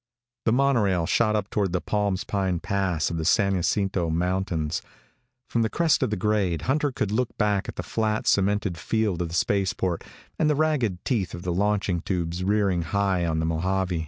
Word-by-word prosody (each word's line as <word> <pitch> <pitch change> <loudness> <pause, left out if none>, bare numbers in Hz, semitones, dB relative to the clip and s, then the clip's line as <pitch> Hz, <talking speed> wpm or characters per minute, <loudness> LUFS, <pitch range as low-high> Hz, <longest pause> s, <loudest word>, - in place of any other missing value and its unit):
The 110 - +3
monorail 115 -9 +2
shot 110 +5 +2
up 105 -2 -2
toward 100 -4 0
the 90 - +1
Palms 100 +1 -1
Pine 95 -3 -1
pass 95 -6 -1
of 85 - -2
the 80 - -2
San 100 +4 +3
Jacinto 95 -1 0
Mountains. 85 -2 -1 0.7
From 115 - 0
the 110 - +1
crest 165 +3 +2
of 130 - +1
the 105 - -1
grade 95 -5 0
Hunter 145 +2 +1
could 105 -5 -2
look 120 +2 -1
back 105 -3 +1
at - - -6
the - - -4
flat, 110 -1 -1
cemented 100 -3 +1
field 105 +1 0
of 85 - -2
the 85 - -5
spaceport 95 -3 0 0.4
and 155 - +3
the 150 - +3
ragged 135 - 0
teeth 110 -10 -1
of 85 - -8
the 90 - -1
launching 100 -2 0
tubes 85 -1 -2
rearing 100 -3 +2
high 90 +1 0
on 80 -1 0
the 80 - 0
Mojave. 90 +2 0
95 Hz, 190 wpm, -25 LUFS, 85-105 Hz, 0.7 s, The